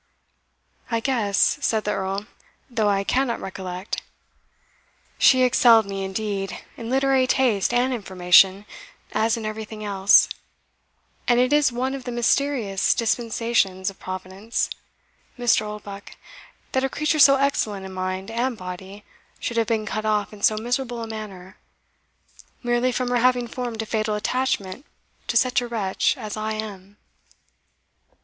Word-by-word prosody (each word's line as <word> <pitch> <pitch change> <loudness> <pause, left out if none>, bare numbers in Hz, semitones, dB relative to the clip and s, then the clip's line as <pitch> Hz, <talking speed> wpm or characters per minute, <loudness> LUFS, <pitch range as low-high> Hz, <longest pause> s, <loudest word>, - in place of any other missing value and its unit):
"I 230 -1 0
guess", 225 -6 +1
said 220 -2 +1
the 210 - -1
Earl, 195 +1 -2 0.5
"though 220 -3 +1
I 200 -1 +1
cannot 250 +3 0
recollect. 185 0 -5 1.2
She 255 -1 +6
excelled 240 -3 +5
me, 195 -1 -4
indeed, 195 0 -3 0.2
in 230 -1 -7
literary 265 0 +2
taste 240 -7 +2
and 245 +2 +2
information, 190 -1 +4 0.5
as 225 +1 +1
in 225 - -5
everything 215 0 -6
else; 200 -1 +5 1.0
and 240 -1 +4
it 255 +3 +3
is 295 -3 +4
one 255 +2 -2
of 270 -2 -6
the 245 - -4
mysterious 240 -4 +1
dispensations 225 -4 0
of 195 - -21
Providence, 185 +4 -4 0.7
Mr. 235 -3 +2
Oldbuck, 205 -1 -9 0.6
that 260 - 0
a 270 - +1
creature 305 +3 0
so 275 -1 +8
excellent 220 -8 0
in 190 - -8
mind 185 +2 -4
and 240 +1 -1
body 190 +2 -8 0.4
should 235 - -3
have 225 -1 +2
been 220 -2 0
cut 215 0 -3
off 210 -1 0
in 205 - -12
so 215 - +3
miserable 240 +1 -2
a - - -5
manner, 200 -4 -8 1.1
merely 240 +1 +1
from 250 0 -2
her 245 - +2
having 245 0 +2
formed 235 -2 -4
a - - -8
fatal 215 -1 -1
attachment 245 -1 -2 0.4
to 235 - +1
such 250 +1 +3
a 245 - -4
wretch 220 +3 0
as 215 -4 -6
I 215 0 -3
am." 205 -2 -7
220 Hz, 145 wpm, -23 LUFS, 195-245 Hz, 1.2 s, so